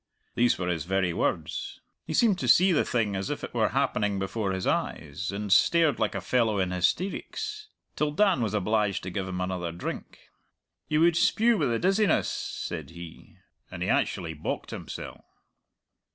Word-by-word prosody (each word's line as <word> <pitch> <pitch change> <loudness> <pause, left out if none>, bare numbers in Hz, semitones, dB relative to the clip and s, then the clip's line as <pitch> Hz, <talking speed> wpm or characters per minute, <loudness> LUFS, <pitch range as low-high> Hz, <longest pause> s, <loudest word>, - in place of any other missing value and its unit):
Those 120 0 +3
were 90 - -3
his 85 -3 -1
very 95 -1 0
words. - - -2 0.3
He 160 - -2
seemed 210 -6 +3
to - - -2
see 185 +2 +6
the 160 - +3
thing 110 -5 0
as 95 0 -3
if - - -4
it - - -6
were - - +2
happening 105 -1 0
before 95 +1 -2
his 95 -1 -3
eyes, 80 +5 -2
and 100 0 0
stared 165 - +4
like 110 -2 0
a 100 - -2
fellow 110 +1 +1
in 95 -1 0
hysteerics, 420 - -2 0.3
till 150 - +1
Dan 185 -1 +2
was 110 -2 -1
obliged 105 0 0
to 95 - -5
give 95 0 -3
him 90 0 -4
another 90 -2 -2
drink. 85 +2 -6 0.7
'You 155 +1 +1
would 170 0 +5
spue 230 +7 +3
with 150 - +1
the 115 - +1
dizziness,' 195 - +2
said - - -5
he, 85 -1 -12 0.3
and - - -5
he - - -2
actually 80 -2 0
bocked 75 - -4
himsell." - - -7
105 Hz, 180 wpm, -27 LUFS, -, 0.7 s, see